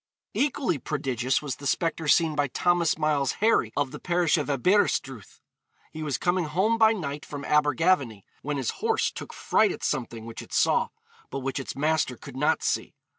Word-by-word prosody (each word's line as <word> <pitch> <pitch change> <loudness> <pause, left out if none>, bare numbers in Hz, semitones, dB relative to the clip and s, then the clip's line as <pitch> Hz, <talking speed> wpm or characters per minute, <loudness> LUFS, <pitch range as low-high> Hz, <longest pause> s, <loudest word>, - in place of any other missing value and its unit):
Equally 270 - 0
prodigious 130 -2 -1
was 140 -5 -4
the 140 - -5
spectre 165 +1 -1
seen 160 0 +4
by 145 -1 +1
Thomas 175 +4 +1
Miles 150 -3 +1
Harry, 215 - +2
of 145 -2 0
the - - -8
parish 175 -2 +2
of 150 -3 -2
Aberystruth. 135 - 0 0.5
He 155 - -7
was 145 -5 -1
coming 175 +4 +1
home 190 +9 +1
by 220 -1 +6
night 150 -9 -4
from 145 -1 -7
Abergavenny, 145 - +2 0.2
when 145 0 -3
his 135 - -1
horse 450 0 +1
took - - -8
fright 215 -3 +2
at - - -7
something 120 -5 -3
which 115 0 -7
it - - -12
saw, - - +3 0.4
but 135 - -4
which 135 +1 -3
its 135 - -6
master 150 -3 0
could 135 +2 -11
not 150 +4 +1
see. - - -1
150 Hz, 180 wpm, -26 LUFS, 135-175 Hz, 0.5 s, by